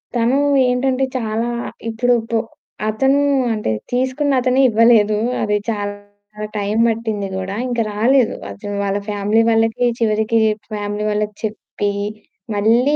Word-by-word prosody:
తను 240 +3 +2 0.3
ఏంటంటే 255 +1 +1
చాలా 225 0 -2 0.4
ఇప్పుడు 245 +2 +1 0.2
పు 230 - +2 0.5
అతను 270 +6 +2 0.3
అంటే 210 - -2 0.2
తీసుకున్న‌తనే 260 0 +1
ఇవ్వలేదు. 220 -2 +4 0.2
అది 210 -1 +1
చాలా 205 0 -6
టైం 205 +1 -1
పట్టింది 220 -3 -2
గూడా 190 +1 -4
ఇంక 240 -1 -2
రాలేదు. 235 +4 +2 0.2
అతను 205 -1 -6
వాళ్ళ 200 0 0
ఫ్యామిలీ 205 +2 +2
వాళ్ళకి 225 +2 +2
చివరికి 220 0 +1
చేప్ 215 0 -1
ఫ్యామిలీ 205 0 -3
వాళ్ళకి 210 0 -2
చెప్పి 210 -1 -3 0.6
మళ్ళీ 235 +8 +3
220 Hz, 120 wpm, -19 LUFS, 210-245 Hz, 0.6 s, ఇవ్వలేదు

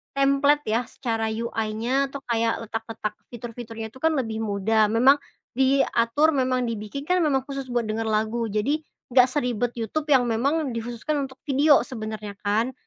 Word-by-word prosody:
templat 275 +2 +3
ya, 225 +2 +1
secara 225 -3 -2
UI-nya, 230 +4 -1
atau 280 - -6
kayak 230 -1 0
letak-letak 225 -1 -4 0.2
fitur-fiturnya 230 -2 -7
tuh 260 - -15
kan 320 0 +2
lebih 225 -4 -2
mudah, 215 +1 +2
memang 255 +6 +5 0.3
diatur, 265 +2 +3
memang 255 -2 +1
dibikin 230 +4 -4
kan 360 +3 +2
memang 275 -5 +2
khusus 275 -1 -5
buat 240 -2 0
denger 220 +1 -2
lagu, 220 +2 0
jadi, 220 +10 0 0.3
nggak 250 -1 +7
seribet 245 -4 -1
YouTube 265 +7 -3
yang 260 -4 +5
memang 270 +6 0
dikhususkan 240 +6 -3
untuk 265 - -15
video, 285 +1 +4
sebenernya, 215 -4 -6
kan? 220 +5 0
240 Hz, 155 wpm, -25 LUFS, 225-275 Hz, 0.3 s, nggak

